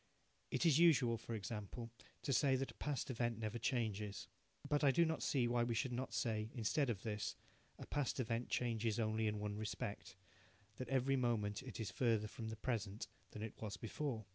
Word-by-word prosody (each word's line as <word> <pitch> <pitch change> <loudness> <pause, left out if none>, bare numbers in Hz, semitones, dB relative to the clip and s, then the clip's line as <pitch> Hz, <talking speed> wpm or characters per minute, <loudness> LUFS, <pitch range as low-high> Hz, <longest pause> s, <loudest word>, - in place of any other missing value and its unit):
It - - +1
is 160 -2 +6
usual, 140 -9 +6
for 115 - -4
example, 110 +2 -5 0.3
to 140 - +1
say 135 +1 +5
that 135 +1 -1
a - - -21
past 140 -3 -1
event 120 -2 0
never 110 +1 -2
changes, 110 -4 -1 0.4
but 145 0 +2
I 140 - +7
do 170 +5 +5
not 160 0 0
see 125 -4 +2
why 120 0 +3
we 120 -1 0
should 130 +3 0
not 130 +2 -2
say, 110 -3 0
instead 125 +4 +2
of 105 -5 -2
this, 105 -2 -2 0.4
"a - - -7
past 145 -2 -1
event 115 -1 -1
changes 115 -2 +1
only 110 0 +1
in 105 0 0
one 105 0 -2
respect 100 -1 -4 0.6
that 130 - -4
every 135 0 +3
moment 110 -5 +1
it 130 -4 -7
is 110 - -2
further 115 -4 +2
from 110 +1 -5
the 110 - -4
present 110 -3 -2 0.2
than 105 - -6
it 110 - -7
was 105 -2 -3
before". 115 0 -3
115 Hz, 195 wpm, -40 LUFS, 110-130 Hz, 0.6 s, I